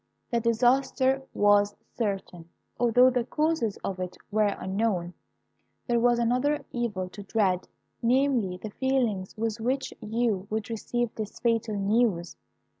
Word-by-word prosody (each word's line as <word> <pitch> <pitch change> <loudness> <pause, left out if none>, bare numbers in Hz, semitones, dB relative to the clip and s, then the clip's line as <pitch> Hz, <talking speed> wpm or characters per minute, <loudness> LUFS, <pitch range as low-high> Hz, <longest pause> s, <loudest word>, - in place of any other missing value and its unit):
"The 235 - +2
disaster 260 +3 +2
was 205 0 +3 0.2
certain, 195 -6 -3 0.3
although 245 +2 +5
the 250 -1 +1
causes 300 -5 0
of 190 -1 -3
it 180 0 -5
were 215 0 +3
unknown. 190 -3 -1 0.7
There 240 -2 +2
was 240 0 +4
another 250 +5 +1
evil 210 -7 -2
to 205 - -10
dread; 195 -3 0 0.3
namely, 245 -6 +2
the 210 +3 -7
feelings 235 -8 -1
with 225 0 -2
which 260 +4 -1
you 215 -3 -1
would 220 +1 -3
receive 240 +1 -2
this 215 -2 -6
fatal 230 -2 +1
news. 200 -4 +1
225 Hz, 130 wpm, -27 LUFS, 200-245 Hz, 0.7 s, although